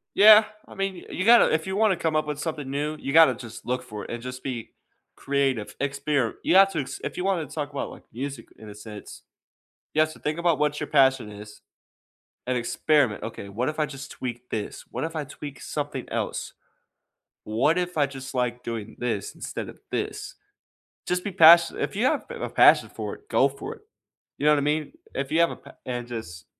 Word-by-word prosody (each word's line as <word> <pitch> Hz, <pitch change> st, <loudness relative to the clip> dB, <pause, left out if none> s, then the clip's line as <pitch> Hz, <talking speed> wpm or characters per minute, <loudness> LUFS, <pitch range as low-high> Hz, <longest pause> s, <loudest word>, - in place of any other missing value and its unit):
Yeah, 215 Hz, +1 st, +9 dB, 0.2 s
I -, -, -13 dB
mean, 195 Hz, 0 st, -2 dB
y 175 Hz, -, -11 dB
you 185 Hz, -, -2 dB
gotta 235 Hz, +1 st, +7 dB
if 160 Hz, +3 st, -1 dB
you 190 Hz, -, -2 dB
wanna 210 Hz, -3 st, +3 dB
come 160 Hz, -2 st, 0 dB
up 155 Hz, -, +1 dB
with 150 Hz, -1 st, -3 dB
something 150 Hz, -4 st, -4 dB
new, 150 Hz, +3 st, -2 dB
you 140 Hz, -, -4 dB
gotta 160 Hz, -5 st, +7 dB
just 120 Hz, -1 st, -10 dB
look 125 Hz, +1 st, -2 dB
for 105 Hz, -4 st, -7 dB
it -, -, -10 dB
and 120 Hz, 0 st, -5 dB
just 125 Hz, +1 st, -7 dB
be 125 Hz, -4 st, -5 dB, 0.5 s
creative, 135 Hz, -6 st, -1 dB
experi 140 Hz, -3 st, 0 dB
You 185 Hz, -, +3 dB
have 195 Hz, 0 st, +7 dB
to 160 Hz, -, -1 dB
ex 135 Hz, +1 st, -6 dB
if -, -, -4 dB
you 180 Hz, -, -3 dB
wanna 185 Hz, -5 st, 0 dB
talk 145 Hz, -1 st, -5 dB
about, 140 Hz, -1 st, -4 dB
like, -, -, -12 dB
music 135 Hz, 0 st, -6 dB
in 110 Hz, -, -11 dB
a 105 Hz, -, -9 dB
sense, 105 Hz, 0 st, -10 dB, 0.7 s
you 155 Hz, -, +3 dB
have 155 Hz, 0 st, +3 dB
to -, -, -14 dB
think 150 Hz, +2 st, -2 dB
about 170 Hz, -2 st, +2 dB
what 150 Hz, 0 st, +1 dB
your -, -, -3 dB
passion 135 Hz, -6 st, +3 dB
is, 105 Hz, 0 st, -11 dB, 0.9 s
and 125 Hz, 0 st, +1 dB
experiment, 120 Hz, 0 st, +1 dB
"Okay, 115 Hz, -3 st, -6 dB
what 120 Hz, +7 st, -1 dB
if 155 Hz, 0 st, -5 dB
I 155 Hz, -, +3 dB
just 135 Hz, -2 st, -9 dB
tweak 125 Hz, 0 st, -6 dB
this? 105 Hz, -2 st, -5 dB
What -, -, -4 dB
if 165 Hz, 0 st, -4 dB
I 155 Hz, -, -1 dB
tweak 145 Hz, 0 st, -9 dB
something 145 Hz, -3 st, -4 dB
else? -, -, -3 dB, 0.9 s
What 125 Hz, +10 st, +1 dB
if 180 Hz, -1 st, -2 dB
I 145 Hz, -, +4 dB
just 135 Hz, -1 st, -8 dB
like 125 Hz, -1 st, -1 dB
doing 115 Hz, -3 st, -5 dB
this 110 Hz, -5 st, -3 dB
instead -, -, -6 dB
of -, -, -13 dB
this?" -, -, -4 dB, 0.7 s
Just 180 Hz, 0 st, 0 dB
be 205 Hz, -, -3 dB
passi 170 Hz, 0 st, +7 dB
if -, -, -2 dB
you 225 Hz, +5 st, +1 dB
have, -, -, +1 dB
eh, -, -, -6 dB
a -, -, -3 dB
passion -, -, +6 dB
for -, -, -5 dB
it, 420 Hz, -, -22 dB
go -, -, +4 dB
for -, -, -7 dB
it, -, -, -21 dB, 0.6 s
you 145 Hz, -, -3 dB
know 150 Hz, -, +6 dB
what 150 Hz, -, +4 dB
I -, -, -1 dB
mean? 150 Hz, -, -1 dB, 0.2 s
If 135 Hz, 0 st, -3 dB
you 160 Hz, -, +2 dB
have 170 Hz, -, +4 dB
a -, -, -6 dB
pa -, -, -15 dB
and 120 Hz, -1 st, -3 dB
just 100 Hz, -9 st, -7 dB
140 Hz, 225 wpm, -25 LUFS, 120-160 Hz, 0.9 s, Yeah